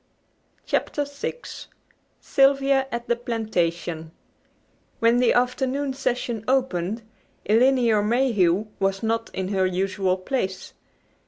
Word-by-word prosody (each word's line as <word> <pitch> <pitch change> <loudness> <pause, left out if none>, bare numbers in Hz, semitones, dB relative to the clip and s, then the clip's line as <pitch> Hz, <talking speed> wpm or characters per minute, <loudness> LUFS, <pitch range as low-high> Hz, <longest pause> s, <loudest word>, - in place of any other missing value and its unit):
CHAPTER 290 - -1
VI 285 0 -4 0.9
SYLVIA 275 0 +3
AT 235 0 -4
THE 235 - +2
PLANTATION 175 -9 -2 0.9
When 230 +1 +3
the 250 -2 +4
afternoon 265 +3 0
session 245 -4 -2
opened 230 -5 0 0.4
Elinor 235 0 +4
Mayhew 210 -5 +2
was 195 +1 0
not 225 0 -1
in 190 0 -3
her 190 -2 +1
usual 185 0 0
place. 190 -1 -3
230 Hz, 100 wpm, -24 LUFS, 190-260 Hz, 0.9 s, the